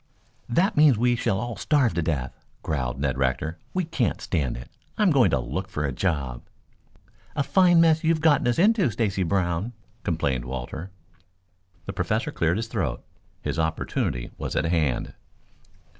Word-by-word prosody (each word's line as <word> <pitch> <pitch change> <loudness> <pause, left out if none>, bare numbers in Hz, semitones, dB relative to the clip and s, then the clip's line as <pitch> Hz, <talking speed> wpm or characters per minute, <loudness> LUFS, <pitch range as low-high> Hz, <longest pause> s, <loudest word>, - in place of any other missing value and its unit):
"That 185 - +2
means 150 -5 +6
we 120 +2 +3
shall 115 -4 0
all 120 0 -4
starve 115 - +2
to 85 - 0
death," 70 -6 -2 0.3
growled 65 -4 -2
Ned 70 -2 -1
Rector. 70 +5 -1
"We 185 - 0
can't 130 -9 -1
stand 70 -9 -1
it. - - -9 0.3
I'm 210 -4 +4
going 135 -5 +5
to 70 - +2
look - - -4
for 75 - -2
a 70 - -1
job." 70 -6 -2 0.9
"A 140 - +1
fine 175 +1 +5
mess 160 -1 +4
you 160 - +2
have 165 -1 +3
gotten 155 -5 +3
us 120 - +1
into, 200 - +4
Stacy 100 -3 -1
Brown," 90 +4 0 0.3
complained 70 - -1
Walter. 65 +8 -5 1.0
The - - -5
Professor - - -1
cleared 85 +3 +1
his 115 +1 -2
throat. 95 - -2 0.4
His - - -2
opportunity 80 -6 -1
was - - -4
at - - +1
hand. 80 -7 0
90 Hz, 165 wpm, -25 LUFS, -, 1.0 s, means